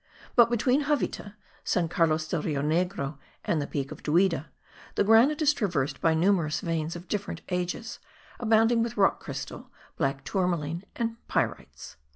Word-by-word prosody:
but, 235 -2 +7
between 250 +5 +2
Javita, 250 -8 -1 0.3
San 175 -2 +1
Carlos 160 -1 +1
del 165 -1 -1
Rio 145 -3 -1
Negro, 155 -3 -1 0.3
and 160 - +1
the 145 - -3
Peak 140 -1 -3
of - - -9
Duida, 165 0 +2 0.5
the - - +3
granite 240 +9 +5
is 300 0 +5
traversed 150 - -1
by 160 -1 +3
numerous 170 -3 +2
veins 165 -2 -2
of 175 +1 -9
different 200 -4 -3
ages, 180 +6 -3 0.4
abounding 225 0 +3
with 235 +1 -2
rock - - +3
crystal, - - -7 0.3
black 135 -2 -1
tourmalin 170 -3 -1
and 230 -1 -2
pyrites. - - -3
180 Hz, 155 wpm, -27 LUFS, 155-225 Hz, 0.5 s, but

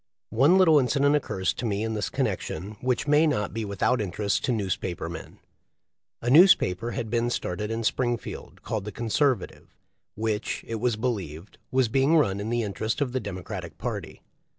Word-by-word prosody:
One 140 +11 +5
little 165 -5 +6
incident 140 +2 +2
occurs 95 -10 -1
to - - -7
me 100 0 -1
in 110 0 -2
this 105 -2 -2
connection 95 +7 -3
which 125 0 0
may 150 +2 +5
not 105 -11 -1
be 115 0 -3
without 105 +4 0
interest 100 +1 -1
to 130 - 0
newspaper 95 -6 -2
men. 85 -2 -9 0.9
A 120 - 0
newspaper 125 - +5
had 115 -4 -4
been 120 0 +1
started 105 -2 -3
in 115 +1 -2
Springfield 120 +1 -3
called 110 -3 -3
the 105 - -5
Conservative, 120 0 -1 0.4
which, 110 0 -2
it 115 -1 -3
was 120 0 +1
believed, 100 -8 -4
was 130 -1 +2
being 135 +7 +3
run 100 -10 +2
in 105 +2 -4
the 120 0 0
interest 110 +4 -2
of 140 -4 0
the 130 - -1
Democratic 95 -5 -7
party. - - -5
115 Hz, 175 wpm, -26 LUFS, 100-130 Hz, 0.9 s, little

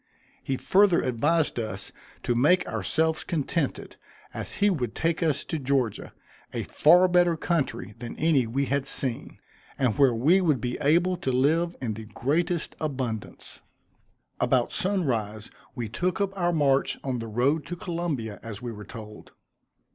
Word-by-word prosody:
He 135 - -2
further 190 +2 +4
advised 145 +4 +1
us 100 -3 -5 0.3
to 120 - +1
make 150 +10 +3
ourselves 155 - 0
contented, 160 -3 -2 0.4
as - - -6
he 205 - +2
would 125 - -2
take 165 +1 0
us 155 -4 +1
to 160 - -4
Georgia, 130 -5 -1 0.4
a - - -3
far 180 +4 +5
better 175 -2 +3
country 150 - -2
than 120 -1 -7
any 150 -6 +2
we 135 +5 0
had 140 0 -1
seen; 130 -4 -3 0.4
and 125 -5 +1
where 135 -4 +5
we 160 +12 +4
would 155 -8 +2
be 125 +1 -3
able 175 +5 +3
to 155 -7 -2
live 160 +7 +2
in 115 -4 -2
the 110 +1 -8
greatest 165 - -1
abundance. 130 -8 -4 0.8
About 125 -2 +2
sunrise 115 - -1 0.2
we 120 -3 -3
took 175 - -2
up 195 -1 -1
our 175 -2 +1
march 140 -4 +2
on 130 -3 -2
the 115 - -5
road 130 +8 +1
to 175 - -4
Columbia, 165 - -4
as 110 -3 -7
we 120 -1 -5
were 105 -2 -9
told. 105 0 -11
140 Hz, 155 wpm, -26 LUFS, 120-170 Hz, 0.8 s, far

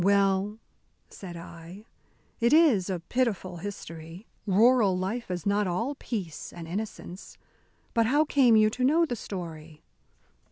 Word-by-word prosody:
"Well," 200 +1 +2 0.5
said 175 -3 -9
I, 170 +4 -11 0.5
"it 235 +2 +3
is 275 - +5
a 180 -3 -2
pitiful 195 -4 -1
history. 170 -1 -8 0.2
Rural 210 -1 +4
life 200 +6 -3
is 180 -2 -4
not 205 0 +2
all 230 +11 -1
peace 200 - -5
and 170 -2 -9
innocence. 190 0 -6 0.6
But 230 -1 +3
how 295 +5 +3
came 260 -6 +4
you 215 0 +5
to 250 +2 -3
know 320 +6 +4
the 245 - -3
story?" 165 -7 -8
200 Hz, 135 wpm, -28 LUFS, 175-235 Hz, 0.6 s, is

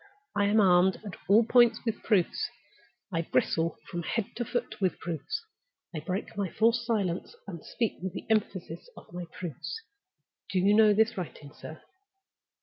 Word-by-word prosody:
I 205 - +3
am 210 +2 +4
armed 185 -1 +5
at 200 - -6
all 210 +4 +6
points 240 -1 +4
with 225 -2 -2
proofs; 190 -5 +1 0.6
I 165 - +1
bristle 165 0 0
from 175 - -4
head 200 +6 -3
to 240 - 0
foot 240 -2 -3
with 185 -2 +1
proofs; 180 - -4 0.5
I 160 - -3
break 185 +5 -4
my 200 -2 -1
forced 230 +3 +2
silence, 195 -6 -1
and 170 -6 -8
speak 230 -3 -2
with 185 -1 -4
the - - -6
emphasis 190 -6 -1
of - - -14
my 175 0 -5
proofs. 165 - -6 0.7
Do 190 - -1
you 195 +3 +4
know 215 0 +6
this 220 +1 +3
writing, 150 -4 -7
sir?" 155 - -10
195 Hz, 165 wpm, -29 LUFS, 175-220 Hz, 0.7 s, all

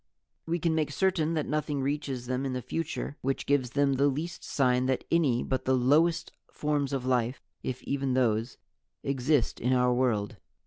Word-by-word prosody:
"We 170 +1 +1
can 165 -1 +1
make 155 -2 0
certain 165 -2 +1
that 155 - 0
nothing 150 -1 -1
reaches 135 -3 -2
them 130 +1 -2
in 135 -1 -2
the 125 - -2
future 165 -2 -4
which 135 +1 -1
gives 140 -3 +2
them 140 +2 +2
the 140 +2 +3
least 155 +5 -3
sign 125 -2 +1
that 130 -1 0
any 140 -8 +3
but 130 - -2
the 130 - +3
lowest 160 +7 +3 0.2
forms 145 -2 -1
of 135 -2 -2
life, 125 0 0 0.2
if 130 -1 -4
even 135 -2 -1
those, 115 -2 +1 0.5
exist 135 -1 +1
in 125 +2 +1
our 125 0 +3
world. 120 -5 0
135 Hz, 180 wpm, -29 LUFS, 125-150 Hz, 0.5 s, the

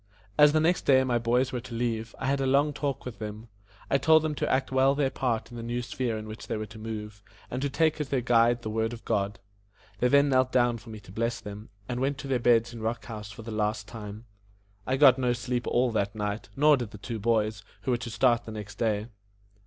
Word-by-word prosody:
As 150 +3 +7
the 155 - +3
next 165 +3 +1
day 130 -1 +6
my 120 -2 +1
boys 125 +3 +1
were 125 - -2
to 120 -1 -8
leave 115 -1 -2
me, - - -15
I - - -2
had 135 +1 +1
a 135 - +1
long 140 +3 +3
talk 140 -1 -3
with 125 -3 -7
them. 110 +1 -7 0.4
I 140 - +2
told 160 +2 +5
them 155 -1 -1
to - - -1
act 130 0 +1
well 135 +1 +4
their 140 -2 +1
part 120 -3 -2
in 120 - -8
the - - -5
new 120 +1 -3
sphere 120 0 -2
in 110 0 -7
which 110 +1 -8
they - - -2
were 110 - -3
to 110 +1 -12
move, 105 -2 -6 0.3
and 125 - -3
to 140 - 0
take 155 +2 +1
as 150 - -4
their 135 - +1
guide 120 0 +3
the 110 - -3
Word 110 +1 -1
of 115 - -10
God. 100 0 0 0.6
They 125 - +3
then 140 +2 +5
knelt 130 -1 +3
down 120 -2 +2
for 115 - -14
me 110 -1 -8
to 100 - -14
bless 115 +3 -1
them, 105 +1 -9 0.2
and 125 0 -3
went 135 +2 0
to 140 - -7
their 130 -2 +1
beds 120 0 +3
in 115 - -8
Rock 115 +1 -2
House 105 -3 -7
for 105 +2 -10
the 115 - -7
last 105 -1 -1
time. 105 +1 -8 0.6
I 130 - +1
got 135 -2 +7
no 125 -1 +2
sleep 120 0 -3
all 125 0 +2
that 100 -2 -1
night, 105 0 -3
nor 150 +1 +5
did 120 -4 -4
the 105 - -10
two 115 +2 -5
boys, 110 -1 +1 0.2
who 120 - -1
were 120 - +2
to 120 0 -6
start 120 +2 +2
the 110 - -7
next 105 -1 -8
day. 110 -2 0
120 Hz, 260 wpm, -28 LUFS, 110-130 Hz, 0.6 s, As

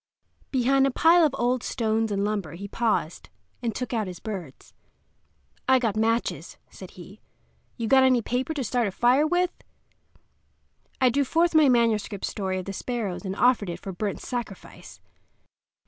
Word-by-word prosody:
Behind 270 +1 +2
a - - +1
pile 330 +6 +4
of 305 - +2
old 245 +1 +1
stones 225 -2 -1
and 200 0 0
lumber 200 -7 -3
he 195 +4 -7
paused, 210 -7 -2 0.3
and 230 -3 -3
took 250 0 -4
out 220 -4 -1
his 180 -1 -8
birds. 185 -11 -8 1.0
"I 260 - +6
got 230 -5 -1
matches," 225 +2 -1
said - - -11
he. - - -12 0.6
"You 230 -2 -3
got 265 +3 +5
any 255 -3 +3
paper 255 +7 -2
to 275 - -2
start 240 0 0
a - - -3
fire 250 +9 +3
with?" 355 +2 +1 1.5
I 255 -2 +4
drew 280 +3 +2
forth 335 +5 +1
my 310 -3 +5
manuscript 225 -5 +1
story 190 -2 -3
of 185 - -5
the 195 - -5
sparrows, 215 -4 -4
and 190 0 -3
offered 240 -4 +2
it 170 0 -5
for 195 - -7
burnt 195 +2 -4
sacrifice. 240 -6 -7
230 Hz, 165 wpm, -25 LUFS, 200-260 Hz, 1.5 s, I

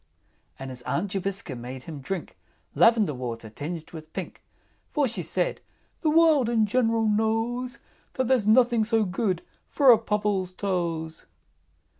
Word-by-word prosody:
And 135 0 -7
his 125 -1 -8
Aunt 185 +9 -2
Jobiska 195 -6 -3
made 125 +2 -8
him 150 -2 -8
drink 180 +6 -5 0.4
Lavender 220 -8 +4
water 115 -4 -6
tinged 160 +7 -6
with 155 -2 -10
pink; - - -6 0.5
For 290 -3 +1
she 215 -6 -4
said, 175 +2 -2 0.4
"The 315 - +2
World 310 -6 +4
in 225 -2 +3
general 225 0 +1
knows 225 +4 0 0.4
There's 260 -4 +1
nothing 235 0 +5
so 225 0 +2
good 185 -1 -1 0.3
for 275 -3 +6
a 230 - +6
Pobble's 205 -4 -1
toes!" 170 -5 -3
205 Hz, 140 wpm, -26 LUFS, 165-230 Hz, 0.5 s, for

